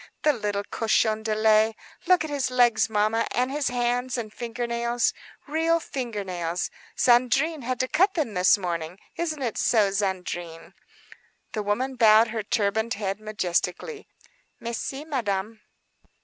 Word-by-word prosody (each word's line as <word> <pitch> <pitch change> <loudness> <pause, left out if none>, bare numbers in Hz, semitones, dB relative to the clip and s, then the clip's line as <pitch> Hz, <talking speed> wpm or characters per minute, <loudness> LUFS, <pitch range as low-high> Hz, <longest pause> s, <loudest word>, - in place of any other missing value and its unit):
The 300 - +4
little 205 -4 -2
cochon 220 0 +1
de 220 -1 -1
lait! 215 0 +4 0.3
Look 365 -1 +5
at 315 - -5
his 280 -3 0
legs, 245 -3 +3
mamma, 215 +1 +1
and 250 +2 +1
his 290 0 -1
hands 245 +1 0
and 215 -3 -5
finger 240 0 -4
nails,—real 245 +7 -1
finger 240 -9 -4
nails. 175 -2 -3 0.3
Zandrine 270 +6 +3
had 255 +1 -3
to 255 - 0
cut 380 +8 +2
them 295 - -1
this 180 +2 +4
morning. 170 -2 -4 0.2
Isn't 315 -4 -3
it 235 -4 -2
true, 210 -4 +3
Zandrine?" 180 -4 -3 0.8
The 215 - -2
woman 250 +6 -1
bowed 220 0 +6
her 220 0 -2
turbaned 220 +2 0
head 200 -1 -3
majestically, 215 - -2 0.5
"Mais 235 0 -4
si, 275 +3 -5
Madame." 220 -6 -2
225 Hz, 145 wpm, -25 LUFS, 205-255 Hz, 0.8 s, bowed